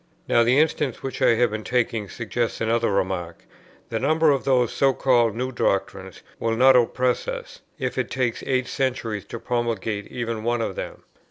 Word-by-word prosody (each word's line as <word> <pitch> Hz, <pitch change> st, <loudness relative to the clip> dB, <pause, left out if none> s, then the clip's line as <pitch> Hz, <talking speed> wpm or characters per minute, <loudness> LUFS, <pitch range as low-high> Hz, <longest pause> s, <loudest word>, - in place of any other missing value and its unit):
Now 120 Hz, -, +4 dB
the 125 Hz, +3 st, +3 dB
instance 150 Hz, -4 st, +1 dB
which 135 Hz, -, -5 dB
I 115 Hz, -, +5 dB
have 120 Hz, -1 st, +2 dB
been 110 Hz, 0 st, -4 dB
taking 115 Hz, -4 st, -1 dB
suggests 115 Hz, 0 st, -3 dB
another 115 Hz, 0 st, +1 dB
remark; 90 Hz, -3 st, -2 dB, 0.4 s
the 115 Hz, -, -2 dB
number 155 Hz, +4 st, +3 dB
of 135 Hz, -2 st, 0 dB
those 125 Hz, -3 st, +2 dB
(so 135 Hz, -1 st, +3 dB
called) 120 Hz, -5 st, +2 dB
new 130 Hz, +2 st, -2 dB
doctrines 95 Hz, -5 st, -2 dB, 0.2 s
will 115 Hz, 0 st, 0 dB
not 130 Hz, +2 st, +6 dB
oppress 125 Hz, +1 st, +1 dB
us, -, -, -6 dB, 0.2 s
if 130 Hz, -3 st, -3 dB
it 125 Hz, -, -1 dB
takes 125 Hz, -3 st, -1 dB
eight 130 Hz, -1 st, +1 dB
centuries 120 Hz, -6 st, -2 dB
to -, -, -7 dB
promulgate 115 Hz, -3 st, -2 dB
even 115 Hz, -3 st, -4 dB
one 120 Hz, 0 st, 0 dB
of -, -, -3 dB
them. -, -, -7 dB
120 Hz, 180 wpm, -24 LUFS, 110-130 Hz, 0.4 s, not